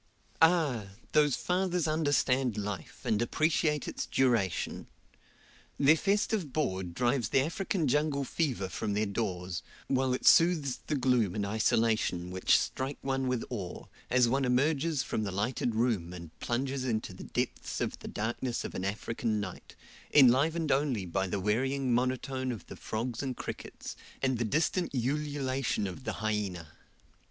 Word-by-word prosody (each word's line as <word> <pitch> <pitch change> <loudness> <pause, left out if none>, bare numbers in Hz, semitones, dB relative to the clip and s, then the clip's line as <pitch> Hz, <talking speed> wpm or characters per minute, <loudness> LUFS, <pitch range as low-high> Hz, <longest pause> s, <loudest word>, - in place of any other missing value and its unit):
Ah! 155 - +4 0.2
those 150 -3 +4
fathers 180 0 0
understand 135 -6 +1
life, 105 -2 -5
and 110 0 +1
appreciate 150 +3 +1
its - - -4
duration. 115 -9 +1 0.9
Their 145 +3 +6
festive 200 -2 0
board 95 - -2
drives 120 -2 +1
the 135 - +4
African 170 +2 -1
jungle 145 +1 +1
fever 130 - -1
from 105 +2 -3
their 105 +1 +1
doors, 95 -4 -3 0.3
while 130 -1 +1
it - - -6
soothes 160 -6 +5
the 150 - 0
gloom 125 -8 +2
and 105 -2 -1
isolation 110 -4 +1
which 95 0 +4
strike 135 +2 -2
one 135 -1 -1
with 125 -2 0
awe, 100 -7 -5 0.2
as 125 -1 +4
one 135 +3 +1
emerges 140 +3 +2
from 110 - -2
the 100 - -2
lighted 110 +4 -1
room 110 -7 0
and 85 -3 -9
plunges 130 +2 -1
into 110 -6 -2
the 90 - -9
depths - - -3
of - - -2
the - - -8
darkness 120 +3 -2
of - - -5
an 95 - -4
African 110 +2 -1
night, 100 -3 -7 0.4
enlivened 150 +4 +5
only 135 -8 +1
by 95 +2 -1
the 95 - -2
wearying 130 +6 +1
monotone 130 +1 0
of 110 -7 -7
the - - -9
frogs 115 +1 -3
and 130 -3 -3
crickets, - - -7 0.2
and 130 -3 0
the 120 - +1
distant 160 - 0
ululation 135 -2 -1
of 100 +8 -6
the - - -1
hyena. 100 -7 -2
125 Hz, 150 wpm, -30 LUFS, 105-140 Hz, 0.9 s, Their